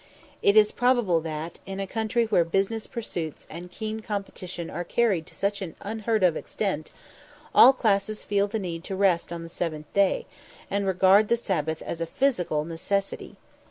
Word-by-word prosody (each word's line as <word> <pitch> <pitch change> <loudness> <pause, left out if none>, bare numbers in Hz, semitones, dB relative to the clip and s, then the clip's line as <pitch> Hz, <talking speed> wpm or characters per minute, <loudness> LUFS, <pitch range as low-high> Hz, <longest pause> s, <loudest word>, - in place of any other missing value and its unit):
It 200 +2 +4
is 210 0 +6
probable 240 -9 +2
that, 160 +1 -5
in 195 0 -5
a 195 - -1
country 225 +3 0
where 205 -6 +3
business 195 +6 -1
pursuits 170 -9 -5
and 175 +2 -8
keen 215 +4 -5
competition 195 -5 -5
are 175 +3 -3
carried 190 -4 +1
to - - -15
such 200 +1 -1
an 175 -5 -6
unheard 220 0 -1
of 175 -3 +4
extent, 185 -7 -3 0.6
all 260 - +9
classes 215 -4 0
feel 200 0 +1
the 215 +2 -3
need 175 -4 -5
of 190 - -3
rest 180 -4 +2
on 170 -1 -5
the - - -7
seventh 160 -3 -5
day, 200 -1 +2 0.5
and 200 0 0
regard 190 +3 +5
the 235 - +2
Sabbath 160 -8 -2
as 170 - -5
a 165 - -1
physical 180 - 0
necessity. 195 +4 -3
195 Hz, 175 wpm, -26 LUFS, 170-215 Hz, 0.6 s, all